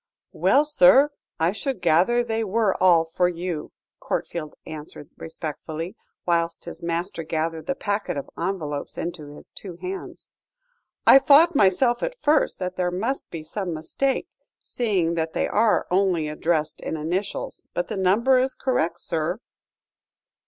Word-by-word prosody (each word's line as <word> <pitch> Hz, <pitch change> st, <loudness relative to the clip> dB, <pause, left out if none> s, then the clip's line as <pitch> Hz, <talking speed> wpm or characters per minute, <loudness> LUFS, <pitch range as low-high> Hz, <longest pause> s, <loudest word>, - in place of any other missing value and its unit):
"Well, 290 Hz, +2 st, +3 dB
sir, 280 Hz, +1 st, +6 dB, 0.3 s
I 165 Hz, +2 st, +3 dB
should 255 Hz, +3 st, -3 dB
gather 180 Hz, +8 st, +3 dB
they 225 Hz, -1 st, -1 dB
were 215 Hz, -1 st, +1 dB
all 170 Hz, -3 st, +5 dB
for 175 Hz, +2 st, +1 dB
you," 170 Hz, -3 st, -4 dB, 0.3 s
Courtfield 155 Hz, -3 st, -4 dB
answered 150 Hz, -1 st, -9 dB
respectfully, 160 Hz, +3 st, -6 dB, 0.3 s
whilst 170 Hz, -1 st, 0 dB
his 165 Hz, -, -5 dB
master 170 Hz, +1 st, -2 dB
gathered 160 Hz, 0 st, -3 dB
the 275 Hz, -, 0 dB
packet 205 Hz, -, -2 dB
of 140 Hz, -, -5 dB
envelopes 150 Hz, -7 st, -4 dB
into 170 Hz, -3 st, -5 dB
his -, -, -13 dB
two 185 Hz, -4 st, -9 dB
hands. 185 Hz, +2 st, -7 dB, 0.8 s
"I 270 Hz, -, +9 dB
thought 295 Hz, +5 st, +6 dB
myself 240 Hz, +2 st, +3 dB
at -, -, -3 dB
first 300 Hz, -4 st, +2 dB
that 185 Hz, 0 st, -4 dB
there 180 Hz, -1 st, +1 dB
must 220 Hz, +10 st, -2 dB
be 165 Hz, -2 st, -7 dB
some 175 Hz, +1 st, -4 dB
mistake, 265 Hz, -, -1 dB, 0.4 s
seeing 195 Hz, -9 st, 0 dB
that 160 Hz, -1 st, -2 dB
they -, -, 0 dB
are 215 Hz, 0 st, +2 dB
only 180 Hz, -4 st, +2 dB
addressed 155 Hz, 0 st, -1 dB
in 160 Hz, -, -3 dB
initials. 180 Hz, +6 st, -3 dB
But 175 Hz, -, -1 dB
the -, -, -4 dB
number 215 Hz, +8 st, +3 dB
is 260 Hz, 0 st, 0 dB
correct, 210 Hz, -11 st, -1 dB
sir." 165 Hz, +3 st, -2 dB
180 Hz, 145 wpm, -24 LUFS, 165-225 Hz, 0.8 s, I